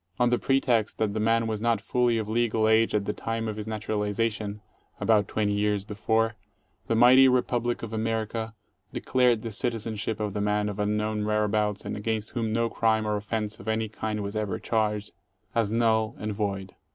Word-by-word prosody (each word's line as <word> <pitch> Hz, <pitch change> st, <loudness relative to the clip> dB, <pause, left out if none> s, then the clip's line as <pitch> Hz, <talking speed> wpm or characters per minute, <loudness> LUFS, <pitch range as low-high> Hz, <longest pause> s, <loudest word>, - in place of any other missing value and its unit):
On 120 Hz, 0 st, +3 dB
the 120 Hz, -, +2 dB
pretext 125 Hz, -5 st, +1 dB
that 110 Hz, -2 st, 0 dB
the 110 Hz, -, -2 dB
man 115 Hz, +1 st, +2 dB
was 110 Hz, -2 st, -2 dB
not 115 Hz, -2 st, +2 dB
fully 120 Hz, +2 st, +1 dB
of 110 Hz, -2 st, -2 dB
legal 110 Hz, -1 st, +1 dB
age 110 Hz, 0 st, +3 dB
at 100 Hz, -1 st, +1 dB
the 105 Hz, -, -1 dB
time 115 Hz, 0 st, -3 dB
of 110 Hz, -, -3 dB
his 105 Hz, 0 st, -6 dB
naturaliza 110 Hz, 0 st, -1 dB
tion 105 Hz, -1 st, -6 dB, 0.2 s
— -, -, -36 dB
about 105 Hz, -3 st, +3 dB
20 105 Hz, -1 st, 0 dB
years 105 Hz, -1 st, 0 dB
before 110 Hz, +2 st, 0 dB, 0.3 s
— -, -, -41 dB
the 115 Hz, -, +1 dB
mighty 125 Hz, +3 st, +7 dB
Republic 120 Hz, -2 st, +1 dB
of 115 Hz, -1 st, -6 dB
America 110 Hz, 0 st, -2 dB, 0.4 s
de -, -, -2 dB
clared 125 Hz, -3 st, +2 dB
the 115 Hz, -, -4 dB
citizenship 110 Hz, -1 st, -2 dB
of 105 Hz, -2 st, -2 dB
the 105 Hz, -, -2 dB
man 105 Hz, 0 st, +1 dB
of 105 Hz, 0 st, -6 dB
unknown 105 Hz, +1 st, 0 dB
whereabouts 105 Hz, -1 st, 0 dB
and -, -, -3 dB
against 110 Hz, 0 st, -2 dB
whom 115 Hz, -3 st, -2 dB
no 115 Hz, +1 st, +1 dB
crime 110 Hz, -1 st, +1 dB
or 105 Hz, 0 st, 0 dB
offence 105 Hz, +1 st, -3 dB
of 95 Hz, -, -12 dB
any 110 Hz, 0 st, 0 dB
kind 105 Hz, -1 st, -3 dB
was 100 Hz, +1 st, -5 dB
ever 105 Hz, -4 st, -1 dB
charged, 105 Hz, -2 st, -1 dB, 0.4 s
as 115 Hz, -3 st, +1 dB
null 110 Hz, 0 st, +1 dB
and 105 Hz, 0 st, -3 dB
void. 100 Hz, -2 st, -3 dB
110 Hz, 200 wpm, -27 LUFS, 105-115 Hz, 0.4 s, mighty